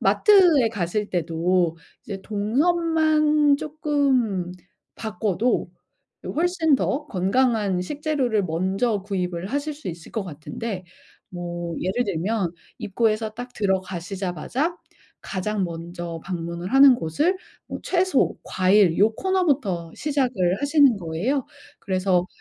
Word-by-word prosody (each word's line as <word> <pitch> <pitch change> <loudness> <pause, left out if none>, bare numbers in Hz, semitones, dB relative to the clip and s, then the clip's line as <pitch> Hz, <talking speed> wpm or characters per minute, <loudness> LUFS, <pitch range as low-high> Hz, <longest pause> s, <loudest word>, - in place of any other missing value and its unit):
마트에 355 - +5
가실 205 0 -2
때도 170 0 0 0.3
이제 195 -2 -6
동선만 305 - +2
쪼끔 275 - 0 0.5
바꿔도 220 +2 -1 0.5
이 - - -7
훨씬 325 -2 +2
더 290 +3 -1
건강한 205 -1 +1
식재료를 270 - -1
먼저 190 +6 0
구입을 180 -3 -3
하실 285 +5 -2
수 290 -5 -12
있을 170 -1 -7
것 220 -4 -3
같은데 185 +5 -6 0.5
뭐 175 -1 -5
예를 195 +7 0
들면 195 +1 -1 0.3
입구에서 215 0 0
딱 245 +3 -8
들어가시자마자 190 - -2 0.5
가장 195 +1 -2
먼저 170 0 -6
방문을 170 +2 -5
하는 270 -1 +8
곳을 295 - 0 0.3
뭐 - - -5
채소, 365 -5 +1
과일 185 -2 +3
요 215 +2 +4
코너부터 275 - 0
시작을 245 -11 0
하시는 285 -5 +4
거예요. 195 - -2 0.3
그래서 185 -2 +1
210 Hz, 245 characters per minute, -23 LUFS, 180-280 Hz, 0.5 s, 하는